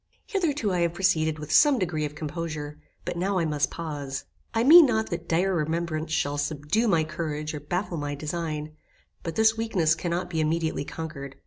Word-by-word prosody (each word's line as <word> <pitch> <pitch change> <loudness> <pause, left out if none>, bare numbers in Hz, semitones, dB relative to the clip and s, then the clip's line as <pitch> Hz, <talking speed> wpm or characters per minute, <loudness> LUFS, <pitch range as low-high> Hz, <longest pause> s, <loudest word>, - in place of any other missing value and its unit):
Hitherto 295 - 0
I 180 - +1
have 170 0 +1
proceeded 160 -4 +2
with 150 0 -7
some 285 - +6
degree 160 -7 -1
of 150 0 -6
composure, 150 -1 -5 0.3
but - - -3
now 190 +2 0
I 170 - +1
must 150 -2 0
pause. 145 -5 -5 0.3
I 225 0 +1
mean 315 +3 +9
not 220 -4 0
that 170 0 -5
dire 185 +4 +2
remembrance 160 -1 -2
shall 145 -2 0
subdue 150 +10 0
my 170 -6 +3
courage 155 -1 -4
or 150 - -4
baffle 175 +4 -3
my 145 -1 -3
design, 155 0 -4 0.5
but 165 - -5
this 220 0 +4
weakness 190 -8 +2
cannot 175 +2 -2
be 160 -2 0
immediately 160 -1 0
conquered. 140 -4 -7
165 Hz, 185 wpm, -26 LUFS, 150-185 Hz, 0.5 s, mean